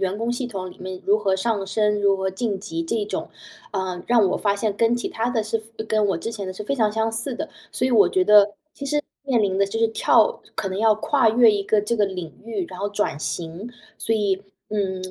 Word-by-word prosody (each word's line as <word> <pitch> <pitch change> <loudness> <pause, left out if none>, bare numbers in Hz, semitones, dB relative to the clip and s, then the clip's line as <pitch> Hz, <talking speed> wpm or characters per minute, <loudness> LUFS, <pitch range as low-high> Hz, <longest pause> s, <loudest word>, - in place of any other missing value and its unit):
员 195 +2 -1
工 230 +1 -1
系 245 0 -3
统 190 -4 -5
里 - - -13
面 185 0 -6
如 205 +2 +4
何 195 -3 +1
上 205 0 0
升、 210 +1 +1
如 200 -1 +4
何 190 0 -1
晋 200 +1 -2
级 165 -4 -4
这 210 +5 -1
种。 210 - -4 0.4
呃， 185 -4 -3
让 235 -4 +5
我 - - +1
发 200 -1 +1
现 205 -1 -1
跟 230 +2 +3
其 240 - -3
它 230 +2 -2
的 225 -3 0
是 220 +1 -2 0.2
跟 215 -1 +2
我 190 -4 +1
之 225 +6 -5
前 205 -3 -5
的 185 - -4
是 210 +3 -7
非 280 - -1
常 220 -5 +2
相 220 +1 0
似 230 +3 -1
的。 315 0 -4 0.2
所 255 - 0
以 - - 0
我 205 -5 +6
觉 185 +1 +2
得 210 0 +6 0.2
其 280 - -7
实 295 +2 +1 0.3
面 235 -4 +3
临 190 -1 0
的 200 - +3
就 200 - -5
是 225 - +4
跳 485 - +3
可 195 - -2
能 190 +1 -4
要 220 0 +4
跨 230 +2 +2
越 235 0 +6
一 205 - 0
个 210 +1 +3
这 235 +3 -1
个 205 -1 +3
领 180 -4 -6
域， 220 -5 -3
然 180 -1 -9
后 205 - -1
转 205 -7 -1
型。 170 +7 -4 0.3
所 225 - 0
以， 200 -3 +1 0.3
嗯， 190 -3 -1
210 Hz, 270 characters per minute, -23 LUFS, 190-225 Hz, 0.4 s, 我